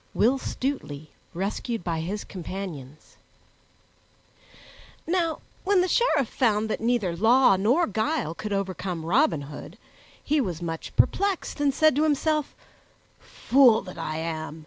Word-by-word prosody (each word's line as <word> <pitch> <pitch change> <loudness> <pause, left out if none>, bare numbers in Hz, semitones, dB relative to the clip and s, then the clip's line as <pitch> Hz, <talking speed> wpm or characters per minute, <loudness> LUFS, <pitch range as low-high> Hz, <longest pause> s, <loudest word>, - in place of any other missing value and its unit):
Will 260 +4 +3
Stutely 155 - -4 0.2
Rescued 200 +4 -3
by 165 -2 -2
His 195 +6 -4
Companions 170 -6 -8 1.9
NOW 335 -2 -1 0.2
WHEN 390 -1 +3
THE 365 - +1
SHERIFF 345 - +2
found 220 -3 0
that - - -3
neither 225 -7 0
law 225 +4 +5
nor 240 - +2
guile 220 - -1
could 210 +5 -6
overcome 185 -4 -3
Robin 205 - +2
Hood, 145 +1 -10 0.5
he 300 0 +1
was 180 -9 -3
much 165 -2 -5
perplexed, 395 -6 +1
and 285 -1 +3
said 310 +1 +3
to - - +3
himself, 305 0 0 0.6
"Fool 245 -5 +3
that 185 -2 -10
I 155 0 -3
am! 160 -1 -5
215 Hz, 130 wpm, -25 LUFS, 170-280 Hz, 1.9 s, law